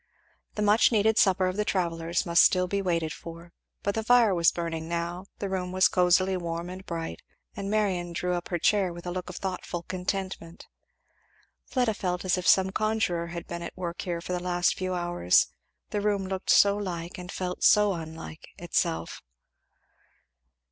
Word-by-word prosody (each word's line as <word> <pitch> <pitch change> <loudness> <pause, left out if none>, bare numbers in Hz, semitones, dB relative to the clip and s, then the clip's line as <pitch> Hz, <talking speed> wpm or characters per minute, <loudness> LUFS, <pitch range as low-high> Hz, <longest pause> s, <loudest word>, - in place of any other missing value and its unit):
The 210 - -1
much 210 +4 +5
needed 220 0 +3
supper 190 -1 +4
of 185 +1 -2
the 210 - +1
travellers 170 -3 -1
must 170 0 +5
be - - +8
still 180 -1 +3
waited 175 -5 -1
for; 170 +1 -11 0.3
but 200 - 0
the 220 - -2
fire 235 -3 +5
was 170 -2 +4
burning 165 -1 -4
now, 170 +2 -3
the 200 - -3
room 185 -1 -3
was 185 0 +4
cosily 185 +1 +3
warm 170 0 -4
and 185 +1 -8
bright, 165 -3 -5 0.3
and 200 -1 -4
Marion 190 -5 0
drew 180 +1 -2
up 175 -1 -3
her 175 - 0
chair 190 +1 +2
with 170 +1 -10
a 175 - -3
look 180 0 -5
of 180 - -8
thoughtful 180 -2 -4
contentment. 185 -2 -4 1.0
Fleda 245 -4 +1
felt 180 -2 -3
as 185 - +3
if 180 -1 -3
some 190 0 +5
conjuror 215 -6 0
had 170 0 -6
been 170 0 -6
at 170 - -7
work 175 -1 -4
here 170 -2 -3
for 180 - -5
the 180 - -2
last 175 0 +1
few 185 -1 -2
hours 175 - +2 0.4
the 205 - -1
room 200 -2 0
looked 190 0 -5
so 200 0 +6
like 180 -2 -5
and 180 +1 -7
felt 180 -1 -4
so 210 -1 +5
unlike 160 -1 -8
itself. 170 -1 -2
180 Hz, 180 wpm, -27 LUFS, 170-195 Hz, 1.0 s, be